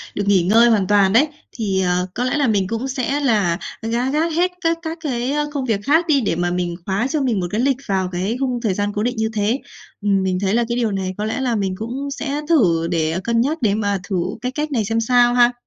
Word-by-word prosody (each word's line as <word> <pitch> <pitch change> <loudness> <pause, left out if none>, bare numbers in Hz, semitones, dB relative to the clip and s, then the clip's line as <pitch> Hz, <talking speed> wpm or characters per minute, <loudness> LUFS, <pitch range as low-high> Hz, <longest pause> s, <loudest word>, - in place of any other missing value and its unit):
được 205 - -1
nghỉ 195 -3 +4
ngơi 225 +6 +5
hoàn 205 -5 +2
toàn 200 -2 +4
đấy. 270 +7 +5 0.2
Thì, 195 -5 -1
ờ, 180 0 0
có 245 - -2
lẽ 255 +3 0
là 280 -3 +2
mình 200 -4 +1
cũng 230 +5 -3
sẽ 265 +2 -1
là 210 -11 +2 0.2
gác 235 +4 -1
gác 320 +3 +1
hết 355 +2 +2
các 330 -1 +1
các 325 0 -5
cái, 255 -4 -2
ơ, 295 0 -1
công 275 -3 -2
việc 220 -5 0
khác 320 +7 +3
đi 280 -4 +3
để 200 - 0
mà 175 0 -1
mình 175 -1 -2
khóa 200 +6 0
cho 295 +1 -1
mình 240 -6 +1
một 175 - -2
cái 215 +3 0
lịch 270 -1 +2
vào 190 -2 0
cái 190 +7 -2
khung 255 -3 -1
thời 210 -6 0
gian 205 +1 -1
cố 210 - -1
định 245 +2 -1
như 220 0 0
thế. 215 +5 0 0.4
Ừm, 200 -2 +1
mình 185 -1 0
thấy 195 0 +1
là 235 +1 +3
cái 235 - 0
điều 230 -3 0
này 190 -1 -2
có 210 - -2
lẽ 220 +4 -2
là 250 -3 0
mình 195 -3 -1
cũng 260 +6 -4
sẽ 290 +1 -3
thử 170 - +3
để 165 0 0
cân 235 0 +1
nhắc, 300 +6 0
để 205 -3 +2
mà 205 -2 0
thử 195 - -1 0.3
cái 250 +1 -2
cách 300 +2 -3
này 225 -6 0
xem 225 +2 0
sao 240 +1 +4
ha. 245 0 +5
225 Hz, 270 wpm, -20 LUFS, 195-265 Hz, 0.4 s, ngơi